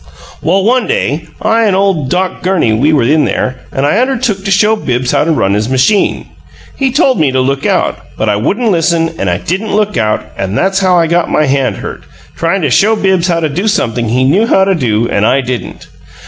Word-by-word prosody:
"Well, 190 +4 +1
one 245 +2 +1
day 150 +4 -2 0.2
I 225 +1 +2
an' 200 -3 +2
ole 190 -6 +1
Doc 185 +5 -2
Gurney, 180 -12 +1
we 135 +8 +2
were 145 -6 +2
in 150 +5 +2
there, 130 0 -2
and 135 - -1
I 175 +9 +2
undertook 250 -6 -1
to 195 - -3
show 210 +3 +3
Bibbs 125 - -2
how - - +1
to 165 - +1
run 100 -10 +1
his 105 +3 -1
machine. 135 +11 +1 0.5
He 270 -2 0
told 270 -2 +2
me 145 -4 +2
to 130 - 0
look 135 +1 -1
out, - - 0 0.2
but 110 - -1
I 105 - +2
wouldn't 210 - 0
listen, 165 -1 +1
and 95 - -1
I 90 - 0
didn't 195 - -3
look 210 0 0
out 110 -2 0
and 95 +2 -3
that's 195 0 +1
how 185 -2 +2
I 170 - +3
got 170 +1 0
my 155 - +1
hand 135 -1 0
hurt, - - -7 0.3
tryin' 170 +2 -1
to 145 - 0
show 215 - +3
Bibbs 190 -4 +1
how 170 -2 0
to 160 - +1
do 180 +9 -2
something 120 - -1
he 125 +3 +1
knew 185 +13 +2
how 190 - +3
to 195 0 +2
do 115 - 0
and 100 - -1
I 130 +5 +3
didn't. 125 -4 -5
165 Hz, 230 wpm, -12 LUFS, 130-195 Hz, 0.5 s, show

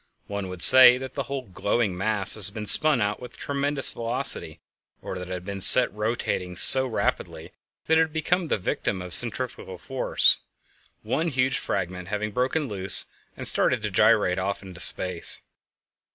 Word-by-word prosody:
One 100 -1 -7
would 90 -2 -3
say 130 -1 +8
that 130 0 -10
the 140 - -5
whole 140 -1 -6
glowing 100 0 -4
mass 100 +1 -3
had 100 -3 +5
been 105 -1 -7
spun 150 +3 +5
about 105 0 -3
with 125 -2 -13
tremendous 140 -1 -3
velocity, 120 +2 -1 0.4
or 95 - -9
that 90 0 -10
it - - -9
had 90 -1 -8
been 100 -1 -8
set 125 +4 +6
rotating 105 -4 -5
so 130 +6 +6
rapidly 115 - -5 0.3
that 160 0 +1
it - - +3
had 160 -1 -2
become 170 +3 -3
the - - -2
victim 95 0 -5
of 90 -1 -10
"centrifugal - - -2
force," - - -1 0.6
one 160 +4 -3
huge 130 -3 -2
fragment 90 -2 -6
having 105 +1 -5
broken 130 +6 -3
loose 95 -4 +2 0.3
and - - +1
started - - +3
to - - -5
gyrate 90 +1 +1
off 100 +2 -5
into 90 -2 -13
space. 90 -1 +2
105 Hz, 170 wpm, -23 LUFS, 95-130 Hz, 0.6 s, say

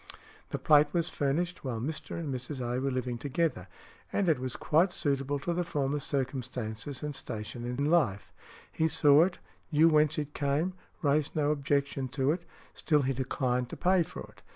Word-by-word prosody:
The - - -2
plate 150 -1 +5
was 170 -1 +1
furnished 165 +5 -1
while 125 -4 -3
Mr. 145 +6 -4
and 155 -5 -3
Mrs. 130 +2 -5
A. 125 +1 -1
were 135 - 0
living 125 -2 -2
together, 145 - -1 0.4
and 200 - +1
it 160 -5 +3
was 130 -1 -4
quite 170 +5 +3
suitable 140 -2 -1
to 170 +5 -2
the 175 +1 0
former's 145 -3 -1
circumstances 130 -2 -3
and 150 0 -3
station 110 +1 -6
in 125 +4 -1
life; 145 - +1 0.4
he 160 - +1
saw 150 0 +6
it, 185 -1 -4 0.3
knew 160 +2 +6
whence 155 -1 +3
it 150 -1 -3
came, 145 +6 0 0.3
raised 145 0 +1
no 150 -1 +2
objection 140 -2 0
to 135 +1 +3
it, 170 +2 -3 0.3
still 150 -4 +2
he 135 +1 +1
declined 125 -1 -1
to - - -7
pay 185 0 +3
for 165 - -5
it. - - -13
145 Hz, 180 wpm, -30 LUFS, 130-155 Hz, 0.4 s, saw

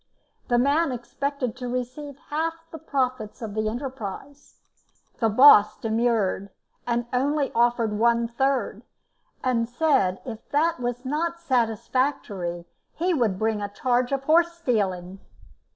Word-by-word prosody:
The 240 - +2
man 285 +5 +2
expected 255 +1 -3
to 250 -1 -5
receive 255 +3 -5
half 325 +2 -1 0.2
the 320 - -8
profits 255 -6 -2
of 220 -4 -6
the 215 0 0
enterprise. 265 +2 -7 0.6
The 225 - +2
boss 215 -2 +7
demurred, 220 -3 0 0.4
and 240 0 0
only 280 +3 +1
offered 235 -2 +2
one 235 +2 +2
third, 240 -3 -1 0.6
and 235 -2 +1
said 245 - +2
if 225 -3 -8
that 325 +2 +1
was 245 +1 -3
not 335 +5 -2
satisfactory 225 - -1 0.3
he 355 +3 0
would 230 - +1
bring 220 0 0
a 205 - -3
charge 245 +4 0
of 275 -1 -1
horse 340 +3 +3
stealing. 195 - -2
245 Hz, 130 wpm, -25 LUFS, 220-280 Hz, 0.6 s, boss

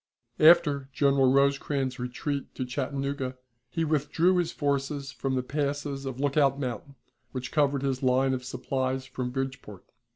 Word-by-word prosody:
After 155 -4 +5
General 135 -2 +3
Rosecrans's 140 -1 +1
retreat 135 +3 -4
to 130 - -3
Chattanooga, 135 0 -3 0.3
he 165 +5 -1
withdrew 160 +4 +2
his 175 -2 0
forces 140 -1 -2
from 135 -1 -2
the 130 - 0
passes 140 0 -2
of 130 -1 -5
Lookout 140 -1 +2
Mountain, 130 +1 -5 0.4
which 130 -1 -5
covered 145 -2 +2
his 135 -2 -1
line 130 +1 +3
of 125 -1 -3
supplies 130 0 -2
from 130 -1 -4
Bridgeport. 130 -6 -5
135 Hz, 140 wpm, -28 LUFS, 130-145 Hz, 0.4 s, After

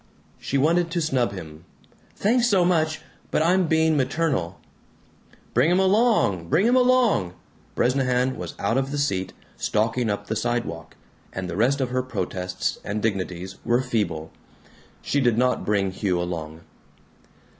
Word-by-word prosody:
She 140 - -2
wanted 165 +5 +2
to 170 +1 -1
snub 130 -8 0
him. 80 -4 -9 0.5
"Thanks 240 +4 +2
so 190 -6 +3
much, 160 -3 +1 0.3
but - - +1
I'm 180 +1 +3
being 160 0 +3
maternal." 135 - -1 0.9
"Bring 125 +7 +3
him 180 - +3
along! 190 - +2
Bring 185 - +3
him 245 +2 +4
along!" 245 - +3 0.4
Bresnahan 125 0 +1
was - - -7
out 115 +3 0
of 135 0 -2
the 145 - -3
seat, 95 -10 -1 0.3
stalking 115 +2 0
up 100 0 -2
the 110 - -3
sidewalk, 115 -8 -3 0.4
and 95 -1 -5
the - - -5
rest 130 +6 +2
of 125 -1 -1
her 130 0 +1
protests 90 -6 -3
and 105 +2 -3
dignities 95 -3 -3
were 120 +2 +2
feeble. 105 -10 -2 0.7
She 145 - 0
did 120 -3 +2
not 125 +1 +1
bring 100 -2 +1
Hugh 95 -2 -1
along. 80 -2 -5
125 Hz, 150 wpm, -24 LUFS, 95-160 Hz, 0.9 s, him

